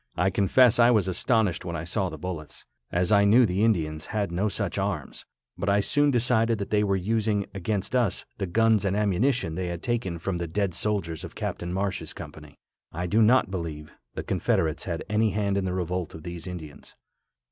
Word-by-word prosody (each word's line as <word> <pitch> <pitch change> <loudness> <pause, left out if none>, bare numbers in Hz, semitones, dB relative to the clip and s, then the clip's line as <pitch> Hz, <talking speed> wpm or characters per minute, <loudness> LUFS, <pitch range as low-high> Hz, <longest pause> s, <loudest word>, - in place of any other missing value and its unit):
I 95 +3 +1
confess 120 +6 +4
I 120 0 +7
was 110 -6 +3
astonished 100 0 +1
when 85 -2 -4
I 80 - -4
saw 95 +3 -1
the 80 - -8
bullets, 75 -2 -7 0.3
as 90 +4 +1
I 100 -1 +6
knew 115 +5 +6
the 95 +1 0
Indians 80 -8 0
had 105 -4 -2
no 95 +5 0
such - - -2
arms, - - -4 0.3
but 95 - -1
I 100 +1 +4
soon 145 +8 +3
decided 115 -3 +2
that 100 -1 -5
they 105 -1 +3
were 100 -1 +1
using 105 +1 0
against 100 +4 -2
us 120 -6 +1
the 95 - -1
guns 110 +2 +3
and 100 -1 0
ammunition 105 - +1
they 90 +2 -3
had 85 -1 -5
taken 115 -8 -1
from 90 +1 -3
the 85 - -3
dead 95 +2 -1
soldiers 85 -5 -1
of - - -9
Captain 85 0 -4
Marsh's 95 +1 -2
company. 75 -2 -11 0.3
I 90 +2 -3
do 105 +6 +2
not 115 -2 +4
believe 80 -5 -5 0.2
the - - -4
Confederates 80 -1 0
had 85 -3 -3
any 110 +1 +2
hand 100 0 0
in 100 -1 0
the 90 - -2
revolt 90 -2 -3
of 80 - -10
these 85 0 -6
Indians. 80 -5 -9
95 Hz, 200 wpm, -26 LUFS, 85-110 Hz, 0.3 s, I